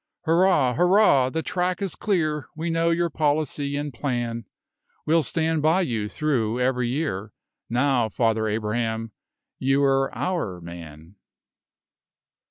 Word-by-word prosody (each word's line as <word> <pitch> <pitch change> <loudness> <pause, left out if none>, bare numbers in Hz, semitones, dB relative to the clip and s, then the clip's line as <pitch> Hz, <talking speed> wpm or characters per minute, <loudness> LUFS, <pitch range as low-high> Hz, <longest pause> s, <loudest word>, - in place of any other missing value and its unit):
Hurrah! 165 -6 +3
hurrah! 175 - +4
the 160 +4 -3
track 180 0 -1
is 195 -4 -2
clear, 155 -8 -1
We 165 +2 -3
know 165 0 +1
your 170 0 +1
policy 145 -1 0
and 145 -1 -4
plan; 120 -3 -3 0.6
We'll 160 +2 +3
stand 160 +2 -1
by 160 +5 +3
you 115 - -2
through 125 -6 -1
every 125 -1 +1
year; 120 -8 -3 0.4
Now, 125 -1 +1
Father 110 0 +1
Abraham, 110 +1 -2 0.5
you're 135 0 +2
our 160 - -2
man. 85 +1 -11
135 Hz, 120 wpm, -24 LUFS, 115-160 Hz, 0.6 s, hurrah